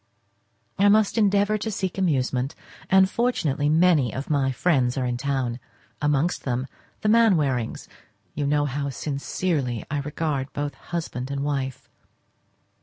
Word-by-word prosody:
I 200 +1 +6
must 215 0 +4
endeavour 205 -1 +3
to 220 - -3
seek 190 -3 -3
amusement, 135 -6 0 0.3
and 190 0 +6
fortunately 165 - 0
many 160 -6 +4
of 135 +4 -5
my 135 -2 +2
friends 130 -4 +1
are 130 - 0
in 125 -1 -1
town; 130 -2 -2 0.4
amongst 150 +3 +1
them 125 0 -1 0.4
the - - -1
Mainwarings; 160 - +2 0.5
you 145 -1 -2
know 145 0 +2
how 140 0 -2
sincerely 140 - -2
I 145 - 0
regard 145 -1 -2
both 145 0 -3
husband 145 -7 -5
and 140 0 -2
wife. 135 -3 -3
145 Hz, 135 wpm, -24 LUFS, 135-180 Hz, 0.5 s, I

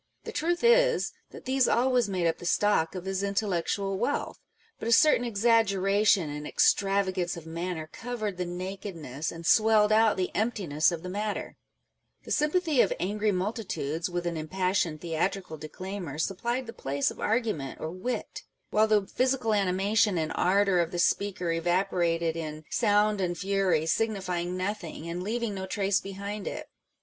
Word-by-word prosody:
The - - -6
truth 345 +4 -1
is, - - +4 0.2
that - - -12
these 260 0 +2
always 245 -2 +2
made 185 -3 -1
up 165 - +1
the - - -9
stock 190 -4 +2
of 185 0 -6
his 190 0 -2
intellectual 195 -1 -1
wealth; 265 +6 -2 0.4
but - - -4
a - - +1
certain 300 -1 +5
exaggeration 200 -4 +3
and 150 0 -5
extravagance 190 -3 +1
of 165 - -9
manner 165 0 -4
covered 220 -5 -4
the 180 - -2
nakedness 175 -5 -5
and 165 0 -9
swelled 215 +1 +5
out 220 -1 +4
the 185 -1 -1
emptiness 190 -9 +1
of 170 -1 -5
the 180 - -5
matter: 210 +2 -3 0.7
the - - -9
sympathy 305 -2 +2
of - - +2
angry 210 +3 0
multitudes 185 - -2
with 175 0 -3
an 170 -1 -2
impassioned 175 -1 -1
theatrical 170 +1 -2
declaimer 170 0 -7
supplied 235 +10 -2
the 230 - -8
place 140 +1 -1
of - - -12
argument 215 - -1
or 160 - -4
wit; 190 +8 -4 0.3
while 215 +1 +4
the 210 -2 +3
physical 255 -1 0
animation 200 +1 +2
and 160 -1 -1
ardour 195 0 +3
of 170 -1 +1
the 175 - -5
speaker 180 0 +1
evaporated 170 -1 0
in 155 -1 -5
" - - -31
sound 210 0 +3
and 175 -2 -1
fury, 190 -4 +1
signifying 180 -2 -1
no 185 +3 0
thing," 165 -5 -9
and 170 +1 -4
leaving 225 +2 -2
no 190 -1 -5
trace 195 0 +1
behind 200 +1 -6
it. - - -6
195 Hz, 165 wpm, -28 LUFS, 175-215 Hz, 0.7 s, certain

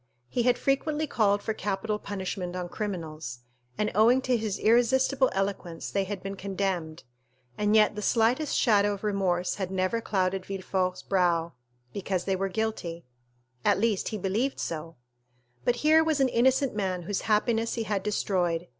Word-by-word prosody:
He 245 - 0
had 245 +1 +3
frequently 295 +3 0
called 205 -7 +1
for 220 - -1
capital 210 +1 -2
punishment 190 -3 -4
on 180 -1 -4
criminals, 160 - -5 0.4
and 210 - 0
owing 230 +5 +5
to 255 -1 +2
his 215 -4 -2
irresistible 260 +4 +3
eloquence 195 -4 -3
they 195 -1 0
had 195 -1 -5
been 195 0 -4
condemned, 190 -5 -3 0.5
and 210 +1 +1
yet 215 -1 +5
the 210 - -4
slightest 240 +7 +2
shadow 205 -3 +3
of 200 - -13
remorse 190 -4 0
had 185 - -1
never 190 +4 0
clouded 190 -3 0
Villefort's 185 -1 -2
brow, 170 -4 +1 0.4
because 190 -2 -2
they 195 - 0
were 195 +1 -1
guilty; 180 -5 -3 0.6
at - - +3
least, 215 -2 +1
he 215 - -3
believed 210 +8 -1
so; 165 0 -4 0.7
but 245 - +3
here 315 +1 +6
was 315 -3 +1
an 265 -1 +3
innocent 260 +3 +2
man 185 -4 -2
whose 195 +3 -2
happiness 225 +1 +2
he 230 - -1
had 210 -2 -1
destroyed. 180 -4 0
200 Hz, 165 wpm, -28 LUFS, 185-225 Hz, 0.7 s, here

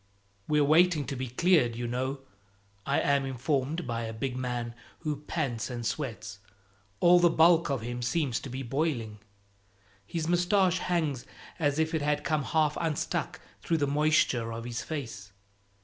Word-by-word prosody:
"We're 150 -1 +3
waiting 155 0 +4
to 135 - -4
be 130 0 -3
cleared, 125 -2 +3
you 120 +1 -4
know," 130 +3 -2 0.7
I 140 - +2
am 140 -1 +2
informed 135 +5 -1
by 115 -1 -3
a 110 - -4
big 125 +3 -3
man 120 -2 -3 0.3
who 150 -3 -2
pants 135 -7 -3
and 120 -2 -5
sweats 115 -6 -4 0.6
all 175 0 +6
the 175 0 +5
bulk 165 0 +4
of 135 -4 -1
him 120 +2 -4
seems 130 0 0
to 135 - -8
be 130 +2 -5
boiling. 120 -5 -2 0.9
His 160 +3 -3
mustache 180 +1 +3
hangs 155 -8 -1 0.3
as 145 -3 +1
if 160 +1 0
it 160 - 0
had 150 0 0
come 150 -1 0
half 155 -2 +1
unstuck 160 -3 -2 0.2
through 165 - 0
the 145 - +1
moisture 145 -5 +2
of 115 0 -5
his 120 0 -4
face. 115 -11 -6
140 Hz, 165 wpm, -29 LUFS, 120-160 Hz, 0.9 s, all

